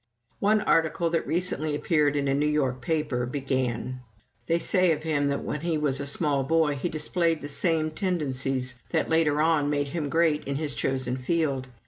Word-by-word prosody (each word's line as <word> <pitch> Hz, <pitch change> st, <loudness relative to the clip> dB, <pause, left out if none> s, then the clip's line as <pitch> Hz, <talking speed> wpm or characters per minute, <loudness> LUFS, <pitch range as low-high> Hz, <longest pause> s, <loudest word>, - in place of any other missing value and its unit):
One 215 Hz, +1 st, +3 dB
article 165 Hz, 0 st, +1 dB
that 165 Hz, -, -1 dB
recently 155 Hz, -3 st, 0 dB
appeared 150 Hz, -2 st, +1 dB
in 140 Hz, -1 st, 0 dB
a 135 Hz, -, +2 dB
New 145 Hz, +2 st, +1 dB
York 135 Hz, -4 st, 0 dB
paper 140 Hz, -4 st, -1 dB
began: 130 Hz, -2 st, -2 dB, 0.5 s
"They 165 Hz, -, +2 dB
say 185 Hz, 0 st, +3 dB
of 155 Hz, 0 st, -5 dB
him 150 Hz, -3 st, 0 dB
that 140 Hz, 0 st, -1 dB
when 150 Hz, -, -4 dB
he 165 Hz, -1 st, 0 dB
was 145 Hz, -3 st, 0 dB
a 140 Hz, -, -3 dB
small 140 Hz, -1 st, 0 dB
boy 160 Hz, +1 st, +2 dB
he 145 Hz, +5 st, -3 dB
displayed 165 Hz, +1 st, 0 dB
the 145 Hz, -, -5 dB
same 155 Hz, +1 st, +2 dB
tendencies 135 Hz, -8 st, -1 dB, 0.2 s
that 160 Hz, -, 0 dB
later 155 Hz, -2 st, +3 dB
on 155 Hz, -3 st, +2 dB
made 145 Hz, -1 st, 0 dB
him 155 Hz, -2 st, -3 dB
great 155 Hz, -1 st, +2 dB
in 140 Hz, -, -3 dB
his 150 Hz, 0 st, -2 dB
chosen 130 Hz, -1 st, -1 dB
field. 135 Hz, -1 st, -1 dB
150 Hz, 185 wpm, -26 LUFS, 135-165 Hz, 0.5 s, One